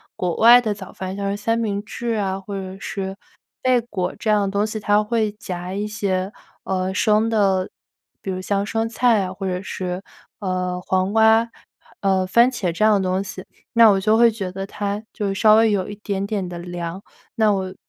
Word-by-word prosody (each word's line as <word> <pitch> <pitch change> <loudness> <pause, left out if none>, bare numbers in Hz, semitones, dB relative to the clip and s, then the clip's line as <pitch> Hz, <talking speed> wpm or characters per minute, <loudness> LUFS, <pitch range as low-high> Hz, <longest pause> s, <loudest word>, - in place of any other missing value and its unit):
国 175 -2 -2
外 240 +2 +8
的 215 -3 -1
早 195 -2 -10
饭， 185 0 -5
像 200 0 -2
是 200 - -1
三 225 +3 0
明 205 -3 -2
治 235 +2 -4
啊， 195 -1 -1
或 200 +1 -7
者 190 0 -6
是 195 0 -5 0.4
贝 255 -2 +3
果 185 -6 -4
这 220 - -3
样 210 -1 +3
的 - - -1
东 200 +1 0
西， 215 0 -4
它 205 +1 +2
会 215 -1 0
夹 180 -3 -6
一 205 +1 -2
些， 195 -2 -2 0.3
呃， 190 0 -2
生 215 +2 +2
的， 195 -4 +1 0.5
比 190 - -4
如 185 - -3
像 200 +1 -1
生 225 +2 -1
菜 230 -2 +2
啊， 185 - -5
或 195 +1 -6
者 180 -1 -2
是， 180 -1 -4 0.4
呃， 185 -2 -2
黄 185 +1 +1
瓜， 225 +1 +4 0.5
呃， 190 -1 +1
番 235 +7 +5
茄 205 -9 -2
这 170 +6 +1
样 215 - +5
的 185 - -1
东 185 +1 0
西。 195 -1 -7 0.3
那 230 -1 +7
我 195 -2 +3
就 215 +3 +3
会 235 -1 +6
觉 200 -4 -4
得 195 +1 -5
它 205 +1 -4
就 205 -3 -2
稍 215 +2 +5
微 225 0 +5
有 200 -3 0
一 205 - -6
点 200 -1 -2
点 200 -3 -2
的 175 -1 -7
凉。 175 +1 -6 0.3
那 220 -2 +3
我 190 -1 -2
200 Hz, 225 characters per minute, -21 LUFS, 185-215 Hz, 0.5 s, 外